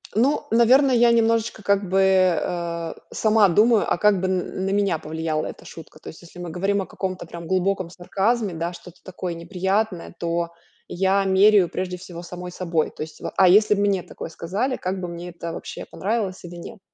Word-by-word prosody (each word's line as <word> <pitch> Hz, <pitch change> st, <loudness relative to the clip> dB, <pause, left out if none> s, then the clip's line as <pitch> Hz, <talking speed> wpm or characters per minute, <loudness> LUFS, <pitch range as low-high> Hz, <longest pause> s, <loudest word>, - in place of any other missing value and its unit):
Ну, 260 Hz, +7 st, +2 dB
наверное, 250 Hz, +3 st, +5 dB
я 235 Hz, 0 st, +5 dB
немножечко, 230 Hz, -1 st, +1 dB
как 200 Hz, -1 st, +1 dB
бы, 190 Hz, +1 st, +2 dB, 0.4 s
а, 170 Hz, -1 st, -3 dB, 0.2 s
сама 215 Hz, -2 st, +4 dB
думаю, 215 Hz, +4 st, +3 dB
а -, -, +2 dB
как 205 Hz, -2 st, +3 dB
бы 190 Hz, -, 0 dB
н 185 Hz, 0 st, -2 dB
на 195 Hz, -, 0 dB
меня 200 Hz, -5 st, +1 dB
повлияла 160 Hz, 0 st, -3 dB
эта -, -, -10 dB
шутка. 155 Hz, -1 st, -12 dB
То -, -, -15 dB
есть 160 Hz, -, -12 dB
если 175 Hz, +1 st, -14 dB
мы 175 Hz, -1 st, -5 dB
говорим 195 Hz, +4 st, 0 dB
о -, -, -4 dB
каком-то 185 Hz, -2 st, -5 dB
прям 170 Hz, 0 st, -9 dB
глубоком 190 Hz, -1 st, 0 dB
сарказме, 200 Hz, +4 st, -1 dB
да, 170 Hz, +2 st, -3 dB
что-то 180 Hz, 0 st, -13 dB
такое 180 Hz, -2 st, -5 dB
неприятное, 185 Hz, +2 st, -2 dB
то 170 Hz, 0 st, -2 dB, 0.4 s
я 195 Hz, +2 st, +1 dB
меряю 195 Hz, 0 st, +5 dB
прежде 180 Hz, 0 st, -4 dB
всего 175 Hz, -2 st, -9 dB
самой 180 Hz, +1 st, -8 dB
собой. 170 Hz, -3 st, -1 dB
То -, -, -11 dB
есть, 155 Hz, -, -11 dB
ва -, -, -6 dB
а 185 Hz, -2 st, +6 dB
если 210 Hz, +2 st, +6 dB
б 200 Hz, -, 0 dB
мне 200 Hz, -2 st, +2 dB
такое -, -, -8 dB
сказали, 200 Hz, +11 st, -2 dB
как 185 Hz, +1 st, -3 dB
бы 180 Hz, -, -3 dB
мне 170 Hz, +1 st, -7 dB
это 170 Hz, -1 st, -7 dB
вообще, -, -, -7 dB
понравилось 200 Hz, -3 st, -3 dB
или 175 Hz, 0 st, -9 dB
нет? 200 Hz, +6 st, -10 dB
185 Hz, 200 wpm, -23 LUFS, 170-205 Hz, 0.4 s, а